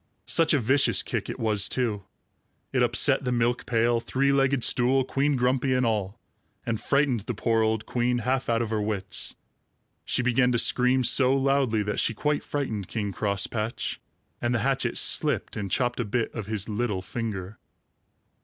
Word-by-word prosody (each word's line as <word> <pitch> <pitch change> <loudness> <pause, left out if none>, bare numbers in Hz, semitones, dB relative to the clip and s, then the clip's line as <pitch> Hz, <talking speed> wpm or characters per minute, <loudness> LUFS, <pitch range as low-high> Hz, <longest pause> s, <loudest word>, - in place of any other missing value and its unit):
Such 165 -2 +3
a - - +2
vicious 130 +4 +2
kick - - -4
it - - -6
was, 105 -3 +1
too! 110 -6 -2 0.7
It 130 - +2
upset 125 +4 +3
the 125 - -1
milk 120 0 0
pail, 115 0 +2
three 135 +4 0
legged 135 -2 +2
stool, 130 +2 +2
Queen 140 +2 0
Grumpy 130 +1 +1
and 125 -1 +1
all, 105 -1 -2 0.5
and 115 -2 -2
frightened 140 -4 +1
the 110 +3 -5
poor 115 +1 +1
old 110 0 0
queen 125 0 0
half 130 0 -1
out 115 0 +1
of 110 - -5
her 110 -1 0
wits. 100 -3 -2 0.7
She 125 - 0
began 125 0 +2
to - - +2
scream 125 +2 +3
so 130 +2 +4
loudly 135 -5 +1
that 105 +1 -2
she 110 - +1
quite 150 +5 -1
frightened 110 -10 -3
King 105 -3 -3
Crosspatch, 105 +3 -2 0.4
and 120 0 0
the - - +1
hatchet 135 -1 0
slipped - - +2
and 100 -2 -4
chopped 120 +4 -1
a - - +1
bit 115 +2 -2
of 110 -4 -6
his 105 -2 -2
little 105 -3 -2
finger. 105 -2 -5
120 Hz, 175 wpm, -26 LUFS, 110-130 Hz, 0.7 s, so